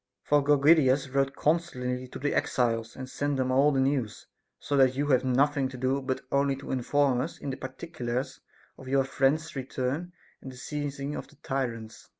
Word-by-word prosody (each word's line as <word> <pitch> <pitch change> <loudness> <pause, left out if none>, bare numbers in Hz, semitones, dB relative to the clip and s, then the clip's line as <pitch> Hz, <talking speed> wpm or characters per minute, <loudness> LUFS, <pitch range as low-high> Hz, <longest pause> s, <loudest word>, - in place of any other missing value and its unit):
For 145 -1 +3
Gorgidas 140 -2 +4
wrote 135 0 +1
constantly 130 -6 -1
to - - -8
the 145 +2 -1
exiles, 115 -2 0
and 130 -1 -7
sent 145 +2 -2
them 130 -1 0
all 140 +3 +4
the 135 - +1
news; 130 -5 -1 0.3
so 145 - -2
that 130 -1 +5
you 145 +2 0
have 130 -2 +4
nothing 135 +1 +2
to 130 - -9
do 130 +2 0
but 130 -1 -2
only 140 0 +2
to 135 - -8
in 130 - 0
form 135 -1 +2
us 160 +6 -5
in 140 - -5
the - - -3
particulars 130 -2 -5 0.4
of 130 - -11
your 135 +1 +3
friends' 140 +4 0
return 135 +5 -3 0.3
and 130 - -8
the 125 - -13
seizing 140 +1 -4
of - - -6
the - - -20
tyrants. 115 -6 -4
135 Hz, 190 wpm, -28 LUFS, 130-145 Hz, 0.4 s, that